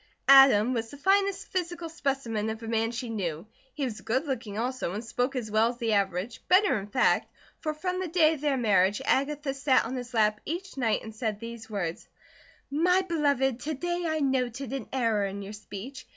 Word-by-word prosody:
Adam 265 -4 +7
was 225 -2 -2
the 285 - -10
finest 390 +4 +2
physical 345 -2 -3
specimen 270 -9 -2
of 220 +1 -5
a - - -6
man 225 0 +1
she 240 +1 -5
knew. 180 -7 -3 0.3
He 285 - -1
was 225 -4 -5
good 260 +7 -1
looking 235 -7 -4
also, 245 -5 -2
and 210 +3 -4
spoke 250 +3 -1
as 225 -4 -3
well 220 +1 +4
as 240 - -6
the 230 -3 0
average, 200 +2 -1
better 375 - +4
in 195 - -8
fact, 250 +5 +2 0.3
for 310 -1 -3
from 365 +3 -2
the 375 - -2
day 325 -2 +4
of 300 - -7
their 290 -3 +1
marriage, 205 -4 +3
Agatha 280 +1 0
sat 275 -1 +2
on 250 +3 -4
his 245 -1 -6
lap 215 -1 +2
each 365 +5 -5
night 235 -5 0
and 220 - -8
said 220 -3 -2
these 230 -1 -8
words: 195 -2 -4 0.6
"My 360 +6 +3
beloved, 280 -7 +1
to 305 +4 -3
day 350 +4 -2
I 315 -1 -1
noted 260 -1 -1
an 270 - -5
error 230 -5 +1
in 200 +1 -5
your 200 +2 -8
speech. 215 +5 -9
250 Hz, 205 wpm, -28 LUFS, 220-295 Hz, 0.6 s, Adam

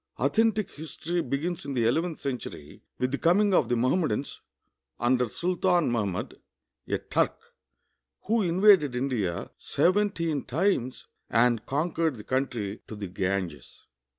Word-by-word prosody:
Authentic 220 -3 +2
histor}' 165 +3 -4
begins 165 +5 -2
in 140 -1 -5
the 120 -2 +2
ele\ 120 +8 +3
enth 170 -2 -4
centur}^ 120 - -6 0.2
with 125 0 -1
the 140 - -2
coming 200 +4 +3
of - - +3
the 120 - +2
Mohammedans 130 +1 0 0.6
under 125 0 +2
Sultan 175 - +1
]\Iahmud, 100 -6 -2 0.5
a - - 0
Turk, - - 0 0.9
who 225 +2 +1
invaded 180 -6 +5
India 120 -9 -2
seventeen 170 -6 +1
times 135 -4 0 0.2
and 115 -1 +3
conquered 160 0 0
the 105 - -9
country 120 -6 -2
to 110 - -7
the 105 -1 -5
Ganges. 90 -5 -4
140 Hz, 130 wpm, -27 LUFS, 120-175 Hz, 0.9 s, invaded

